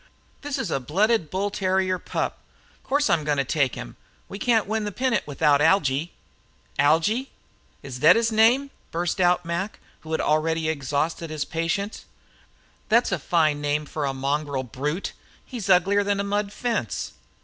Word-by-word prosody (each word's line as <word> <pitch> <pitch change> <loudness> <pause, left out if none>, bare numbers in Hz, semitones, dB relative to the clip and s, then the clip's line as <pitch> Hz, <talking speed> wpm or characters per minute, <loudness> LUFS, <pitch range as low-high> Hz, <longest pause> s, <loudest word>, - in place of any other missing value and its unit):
"This's 290 -1 -3
a 135 - +1
blooded 185 - +1
bull 195 +4 -1
terrier 185 -1 0
pup. - - -3 0.4
Course 285 +2 +1
I'm 170 -5 +2
going 145 -1 0
to 140 - +2
take 135 -1 0
him. - - -8 0.3
We 200 - -8
can't 225 -2 +2
win 220 +1 -1
the 205 - -3
pennant 245 - 0
without 145 0 +3
Algy." 160 -2 +2 0.7
"Algy? 205 - +2 0.5
Is 130 -2 -7
thet 155 - +7
his 230 0 +2
name?" 240 +6 +4 0.2
burst 175 +3 -1
out 180 0 +3
Mac, 170 +5 -3 0.2
who 160 - -11
had - - +1
already 160 +1 +1
exhausted 155 +3 -2
his 155 -2 -3
patience. 165 +6 -3 0.8
"Thet's 235 +1 +3
a 190 - 0
fine 155 -2 +1
name 150 +1 0
for 150 0 -3
a 135 - 0
mongrel 140 0 -2
brute. 145 - -3 0.3
He's 230 -7 -6
uglier 195 +2 +4
than 200 0 0
a - - 0
mud 200 0 -1
fence." 210 - -2
170 Hz, 160 wpm, -24 LUFS, 150-205 Hz, 0.8 s, thet